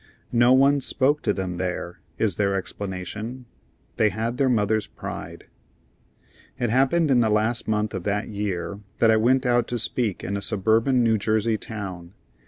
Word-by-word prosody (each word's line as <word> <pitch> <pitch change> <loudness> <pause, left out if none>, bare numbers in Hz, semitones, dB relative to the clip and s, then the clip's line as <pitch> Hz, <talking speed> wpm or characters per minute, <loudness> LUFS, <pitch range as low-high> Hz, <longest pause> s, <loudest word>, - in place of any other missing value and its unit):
"No 120 +1 +5
one 140 +2 +5
spoke 140 +3 +1
to 105 - +1
them 95 -3 -3
there," 90 -1 -4 0.2
is 100 -6 0
their 100 -1 +1
explanation. 100 +6 -5 0.5
They 110 - +4
had 115 +4 -3
their 135 -2 +2
mother's 110 -2 +1
pride. - - -8 1.1
It 120 -3 -1
happened 135 +5 +3
in 125 - +5
the 115 -2 +3
last 110 +3 0
month 105 -1 0
of 95 - -4
that 105 +1 -1
year 100 -2 -4 0.2
that 115 - +4
I 110 - +4
went 130 +4 +2
out 120 -1 +2
to 120 - -2
speak 115 -3 -1
in 100 - -3
a 100 - -3
suburban 115 +5 +2
New 110 -2 +2
Jersey 110 +2 +1
town. 95 -5 -7
110 Hz, 170 wpm, -24 LUFS, 100-120 Hz, 1.1 s, No